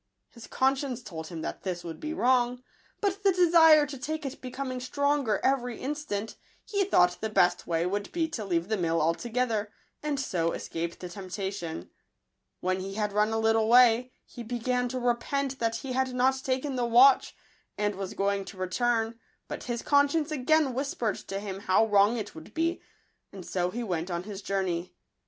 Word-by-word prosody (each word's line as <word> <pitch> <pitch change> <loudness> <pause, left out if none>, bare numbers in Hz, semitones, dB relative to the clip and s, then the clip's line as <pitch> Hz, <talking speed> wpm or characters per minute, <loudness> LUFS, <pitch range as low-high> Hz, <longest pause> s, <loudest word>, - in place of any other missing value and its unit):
His 235 -2 -12
conscience 265 -2 0
told 160 -5 -7
him 165 -2 -7
that - - -5
this 180 -2 -4
would 165 -2 -7
be 310 - -4
wrong; 250 -3 +2 0.4
but 400 -1 0
the 395 - +5
desire 330 -4 +6
to 280 -2 -8
take 305 +3 -4
it 275 - -6
becoming 255 0 -4
stronger 280 -4 0
every 250 -3 0
in 280 +3 -2
stant, 225 -8 -5 0.3
he 405 -1 0
thought 180 - +3
the 220 - -1
best 180 -4 +2
way 165 0 0
would 200 +2 -2
be 330 -2 0
to 235 -8 -4
leave 175 -3 -1
the 220 0 0
mill 165 -2 +1
altogether, 220 +6 0 0.3
and 295 -2 -2
so 170 -11 -1
escape 170 +1 -4
the 180 - -7
temptation. 185 - -5 0.7
When 185 +1 0
he 195 +1 -6
had 210 -1 -1
run 210 +1 +3
a 225 - 0
little 225 0 +2
way, 245 0 +6
he 240 - -10
began 245 +1 -1
to 255 +1 -3
repent 260 +3 -1
that 230 -1 0
he 255 +2 -5
had 260 0 0
not 265 +1 +2
taken 260 +1 -1
the 245 - +1
watch, 255 +4 +5 0.4
and 205 0 0
was 195 -1 -6
going 200 0 0
to 190 - -10
return, 225 +4 0 0.3
but - - -6
his 240 -1 -3
con 285 0 +4
science 315 +1 -1
again 300 0 +2
whispered 265 - -2
to 195 - -3
him 195 -2 -5
how 195 +2 +3
wrong 205 +2 +4
it 215 - -5
would 160 0 -12
be; 330 +2 0 0.5
and 190 -3 -9
so 180 -1 -1
he 235 +6 -4
went 175 -4 -2
on 175 0 -3
his 205 0 -7
journey. 185 -3 -2
235 Hz, 190 wpm, -28 LUFS, 195-265 Hz, 0.7 s, desire